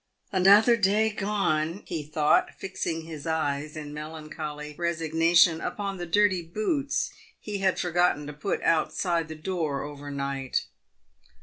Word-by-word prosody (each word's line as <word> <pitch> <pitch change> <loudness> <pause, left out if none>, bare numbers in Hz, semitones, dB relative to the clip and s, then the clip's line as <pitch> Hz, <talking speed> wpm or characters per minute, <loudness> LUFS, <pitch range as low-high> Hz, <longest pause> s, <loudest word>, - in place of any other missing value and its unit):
"Another 205 +5 +6
day 210 +2 +3
gone!" 195 -5 -1
he 165 -3 -3
thought, 150 0 +2
fixing 170 -4 -3
his 160 -2 -8
eyes 150 -1 -1
in 150 -1 -7
melancholy 150 -1 -6
resignation 165 0 +3
upon 200 -2 -3
the 175 -1 -5
dirty 190 0 +3
boots 240 - -1 0.3
he 205 -2 -5
had 190 -1 +1
forgotten 175 -4 +1
to 150 - -7
put 155 +7 -3
outside 165 +1 +1
the 160 - -7
door 155 -3 -2
overnight. 140 -2 -3
165 Hz, 125 wpm, -27 LUFS, 150-190 Hz, 0.3 s, Another